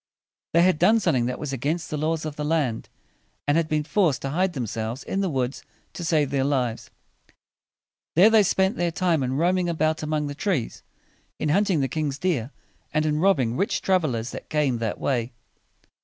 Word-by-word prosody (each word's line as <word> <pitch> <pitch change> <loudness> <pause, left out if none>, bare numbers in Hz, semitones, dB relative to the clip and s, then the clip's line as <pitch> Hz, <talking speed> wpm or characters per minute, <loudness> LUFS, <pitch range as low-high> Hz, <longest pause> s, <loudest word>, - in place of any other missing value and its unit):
They 170 +1 +5
had 185 -4 +3
done 215 +6 +5
something 125 - +1
that 125 - -3
was 145 -3 -5
against 155 +6 -2
the - - -1
laws 160 +1 -1
of 155 -2 -5
the 150 - -4
land, 150 -7 -1 0.6
and 145 - +3
had 165 -1 +2
been 155 -1 0
forced 165 -3 +1
to 135 - -2
hide 180 +4 +1
themselves 115 -1 -4
in 195 - -2
the 190 - 0
woods 130 -2 -2 0.3
to 175 - -6
save 155 -4 +1
their 135 -1 +1
lives. 130 -5 -1 1.3
There 195 +7 +7
they 220 -1 +6
spent 190 +2 +1
their 175 -1 +1
time 165 -2 +1
in 130 0 -1
roaming 175 +4 +1
about 155 -1 0
among 155 -1 -1
the 145 - -4
trees, 160 - -2 0.6
in 150 - -1
hunting 190 -1 +2
the 135 - +1
king's 145 0 -2
deer, 145 -9 -1 0.4
and 155 0 +1
in 150 0 +1
robbing 140 -11 +2
rich 195 +7 0
trav 185 -2 +2
el 135 -6 -1
ers 115 +2 -4
that - - -9
came 145 -6 +1
that 115 -2 -3
way. 120 -3 -1
155 Hz, 200 wpm, -24 LUFS, 135-175 Hz, 1.3 s, There